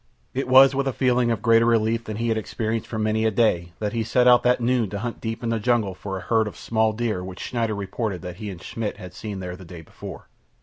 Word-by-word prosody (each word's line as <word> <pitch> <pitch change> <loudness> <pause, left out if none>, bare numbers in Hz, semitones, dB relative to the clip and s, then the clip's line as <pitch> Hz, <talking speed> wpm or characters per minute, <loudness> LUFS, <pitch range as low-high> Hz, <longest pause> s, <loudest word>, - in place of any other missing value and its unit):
It 135 0 -2
was 130 +1 +7
with 135 0 0
a 135 - 0
feeling 125 -2 +2
of 115 -3 -1
greater 115 -1 +5
relief 115 0 +2
than 110 -1 -5
he 115 +1 -1
had 110 - +1
experienced 110 0 -3
for 110 - -5
many 110 0 +1
a 110 - +4
day 90 -6 +1
that 105 0 -3
he 115 -1 0
set 125 +2 +2
out 125 -1 +7
that 125 0 +3
noon 120 -3 +1
to 100 - -4
hunt 115 +3 -5
deep 115 +1 -4
in 115 - -1
the 115 -1 0
jungle 110 -4 +1
for 95 +1 -6
a - - -6
herd 110 +2 +1
of 105 - -8
small 110 -1 +1
deer 110 -4 -2
which 95 0 -8
Schneider 115 -3 -2
reported 100 -1 -3
that 90 -1 -7
he 105 0 -6
and 90 -2 -9
Schmidt 110 +1 -4
had 90 0 -10
seen 100 -3 -6
there 90 -1 -5
the 95 - -12
day 85 -1 -10
before. - - -10
110 Hz, 265 wpm, -24 LUFS, 100-120 Hz, -, was